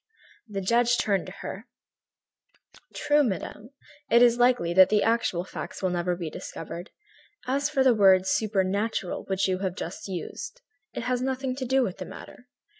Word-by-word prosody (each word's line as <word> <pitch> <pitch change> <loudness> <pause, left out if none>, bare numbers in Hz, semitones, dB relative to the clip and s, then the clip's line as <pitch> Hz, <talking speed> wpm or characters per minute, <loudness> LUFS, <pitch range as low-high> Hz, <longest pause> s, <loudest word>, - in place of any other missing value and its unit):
The 200 -2 -4
judge 235 +4 +3
turned 200 -3 0
to - - -7
her: 200 +5 -7 1.3
"True, 295 0 +3
madame, 210 0 -4 0.4
it 235 +1 +6
is 240 0 +4
likely 245 -9 +3
that 190 +1 +7
the 210 -1 +3
actual 225 -6 +1
facts 190 - -8
will 185 - +1
never 175 0 0
be 170 -3 -5
discovered. 170 +2 -7 0.6
As 280 +3 0
for 275 -3 +2
the 260 -2 +5
word 190 -3 +5
'supernatural' 200 -1 -1
which 190 0 0
you 185 -1 0
have 190 -2 -2
just 175 +3 -6
used, 190 - -6 0.4
it - - -3
has 250 0 -1
nothing 260 0 -2
to 260 -1 -4
do 265 +1 +3
with 190 -6 -4
the - - -5
matter. 245 - -12
210 Hz, 170 wpm, -26 LUFS, 185-245 Hz, 1.3 s, that